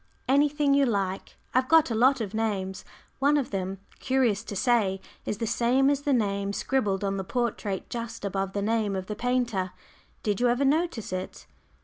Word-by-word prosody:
"Anything 285 +1 +3
you 280 0 +4
like. 195 -4 -2 0.2
I've 255 +1 +2
got 325 -6 +5
a - - +1
lot 255 +3 +4
of 205 -2 -4
names. 200 -4 -2 0.4
One 285 +2 +4
of 275 - -2
them, 190 -1 -3 0.2
curious 250 -6 +1
to 205 - -6
say, 205 -3 +2 0.3
is 210 - -1
the 230 - -2
same 255 +5 +3
as 285 -1 0
the 285 - 0
name 200 -5 0
scribbled 205 -6 0
on 195 0 -1
the 190 - -2
portrait 210 -3 -2
just 230 -2 -5
above 195 0 -2
the 200 - -1
name 215 -2 0
of 190 -1 -3
the 210 - -5
painter. 235 -6 -1 0.5
Did 210 0 0
you 245 - +4
ever 245 +3 +2
notice 290 - 0
it?" 185 0 -5
225 Hz, 190 wpm, -27 LUFS, 195-260 Hz, 0.5 s, got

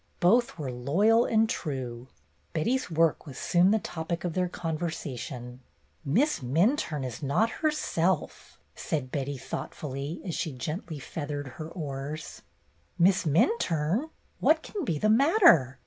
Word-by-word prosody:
Both 230 +4 +3
were 140 -5 -4
loyal 195 - +3
and 225 0 +3
true. 130 - -4 0.5
Betty's 245 +11 0
work 165 -2 +1
was 135 - -9
soon 180 +1 +3
the 220 - +4
topic 170 -3 -4
of 175 -2 -2
their 180 0 0
conversation. 150 -8 -5 0.4
''Miss 230 - +2
Minturne 155 - +1
is 125 +2 -6
not 155 +11 +1
herself," 245 - -1
said 145 -7 -3
Betty, 140 0 -2
thoughtfully, 140 +3 -5
as 175 - -3
she 160 -3 -2
gently 155 +4 -5
feathered 145 0 -5
her 155 +5 -8
oars. 150 -2 -6 0.3
" - - -39
Miss 185 +1 +4
Minturne! 170 - +1 0.3
What 315 0 +3
can 400 -7 -4
be 165 -9 0
the 215 - +1
matter 225 - +5
160 Hz, 135 wpm, -28 LUFS, 140-205 Hz, 0.5 s, matter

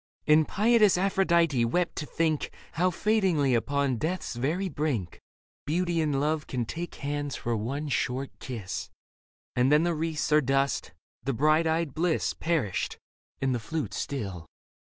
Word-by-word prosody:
And 155 0 +5
pietous 215 -2 +4
Aphrodite 170 -8 +3
wept 175 +9 0
to 150 - -3
think 160 -2 0 0.2
How 180 +2 +2
fadingly 180 - +2
upon 140 +1 0
death's 160 -1 -2
very 155 +11 -1
brink 140 - -2 0.5
Beauty 170 +1 +1
and 145 -3 +1
love 150 +1 0
take 135 +8 -4
hands 145 0 -3
for 120 0 -2
one 135 +8 -3
short 130 0 -1
kiss 115 -8 -5 0.3
— - - -80
And 125 +3 +3
then 150 +2 +5
the 175 0 +1
wreaths 160 -1 -2
are 150 0 +6
dust, 135 +1 0 0.3
the 135 +3 -1
bright 155 +6 +3
eyed 160 -3 0
bliss 165 0 +1
Perished, 145 - -1 0.5
and 135 -1 +2
the 120 - -1
flute 155 +8 -4
still. 100 - -4
150 Hz, 150 wpm, -28 LUFS, 130-170 Hz, 0.5 s, are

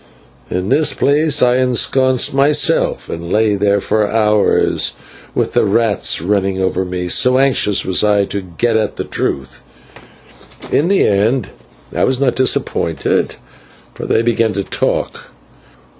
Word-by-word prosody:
"In 90 +2 -3
this 155 -1 +2
place 150 0 +2
I 125 0 +3
ensconced 130 +1 +1
myself, 140 +2 +1
and 85 +1 -7
lay 110 0 +2
there 100 0 +1
for 105 +1 0
hours, 105 -2 +1 0.4
with - - -1
the - - +2
rats 105 -5 0
running 95 0 -1
over 95 0 -1
me, 90 -1 -4
so 125 +8 +3
anxious 130 -7 +1
was 95 +1 0
I 105 -1 +2
to 100 0 -5
get 95 +6 -2
at 110 -2 -1
the - - -4
truth. 65 -3 -4 1.1
In 155 - +2
the 195 +1 +2
end 105 +4 +1 0.5
I - - 0
was 130 -1 -1
not 135 -3 +1
disappointed, 105 -10 -1 0.6
for - - -7
they 115 - +1
began 115 -2 +1
to 100 - -2
talk. - - -3
105 Hz, 145 wpm, -15 LUFS, 95-130 Hz, 1.1 s, I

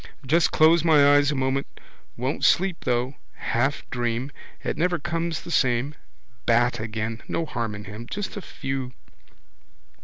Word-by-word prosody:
Just 160 +6 +3
close 160 +1 +5
my 145 -3 +6
eyes 145 0 +4
a 150 - 0
moment. 135 +1 0 0.5
Won't 130 +4 -2
sleep, 185 -1 +2
though. 125 +3 0 0.2
Half 135 +4 -1
dream. 120 +2 -2 0.3
It - - -2
never 175 +3 +1
comes 165 +1 -2
the 170 - -7
same. 130 0 +2 0.5
Bat 120 +1 +3
again. 110 +1 -4
No 165 - -1
harm 115 -7 -3
in 105 - -8
him. 105 +3 -8
Just 205 0 -4
a 205 - -5
few. 135 -6 -5
135 Hz, 150 wpm, -25 LUFS, 120-160 Hz, 0.5 s, my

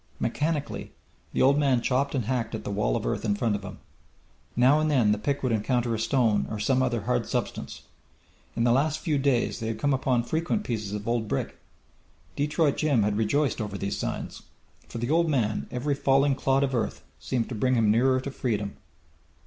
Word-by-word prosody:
Mechanically 150 +4 -2 0.4
the - - +1
old 140 +2 +5
man 135 -4 +3
chopped 135 +4 0
and 125 -5 -1
hacked 115 -2 -1
at 110 - -6
the - - -4
wall 100 -12 0
of - - -2
earth - - -1
in 105 -3 +1
front 105 0 0
of 100 - -4
him. 100 -2 -8 0.8
Now 130 +5 +5
and 155 0 +1
then 125 -8 +3
the 105 - +1
pick 140 +6 -2
would 130 - +1
encounter 120 +2 0
a 110 - -2
stone 115 -2 +2
or 110 - -4
some 130 +5 +2
other 120 -3 0
hard 60 - -1
substance. - - -4 0.7
In 115 - 0
the 120 - +4
last 145 +5 +2
few 155 -3 -1
days 135 -4 +1
they 110 - -3
had 115 - -2
come 145 -1 +1
upon 130 -2 +1
frequent 165 - -1
pieces 110 - -3
of 105 +1 -5
old 115 -2 0
brick. 70 - -2 0.8
Detroit 150 0 +1
Jim 140 -8 +2
had 105 0 0
rejoiced 120 +5 +1
over 105 -2 -4
these 100 +1 -3
signs. - - -4 0.5
For - - -6
the 120 +4 -2
old 165 +1 +3
man 115 -7 0
every 130 +4 -1
falling 140 0 +3
clod 135 +1 +1
of 135 -1 -1
earth 120 - -2 0.2
seemed 115 - -2
to - - -4
bring 125 +4 +1
him 110 -3 +3
nearer 130 +4 +3
to 140 - -5
freedom. 105 -6 -2
125 Hz, 205 wpm, -27 LUFS, 110-140 Hz, 0.8 s, old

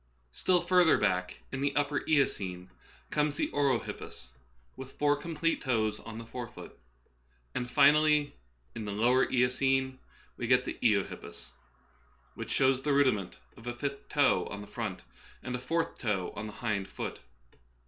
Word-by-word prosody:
Still 180 - +2
further 180 -3 +5
back, 90 -3 -1
in 135 - -3
the 140 0 0
upper 145 0 +1
Eocene, 95 - 0 0.4
comes 150 -1 +1
the - - -1
orohippus, 135 - -2 0.5
with 130 0 -9
four 145 0 +2
complete 165 +2 -1
toes 110 -5 0
on 115 -1 -9
the 115 - -7
fore 120 +1 -6
foot. - - -12 0.8
And 125 0 -3
finally, 150 +2 +5 0.4
in 110 - -5
the 105 - -3
lower 120 +5 +3
Eocene, 130 +1 +2 0.4
we 115 - -3
get 125 +1 +4
the - - -5
eohippus, 105 -5 -1 0.8
which - - -7
shows 130 -1 +3
the 145 +1 +1
rudiment 130 -10 +2 0.2
of 115 - -13
a 120 - -3
fifth 140 +2 -5
toe - - +3
on 100 - -6
the - - -8
front 105 -4 -5 0.4
and 125 -1 -3
a - - -3
fourth 165 +6 -2
toe 95 -5 -1
on 110 - -5
the 105 - -8
hind 100 -4 0
foot. - - -6
130 Hz, 160 wpm, -30 LUFS, 110-145 Hz, 0.8 s, further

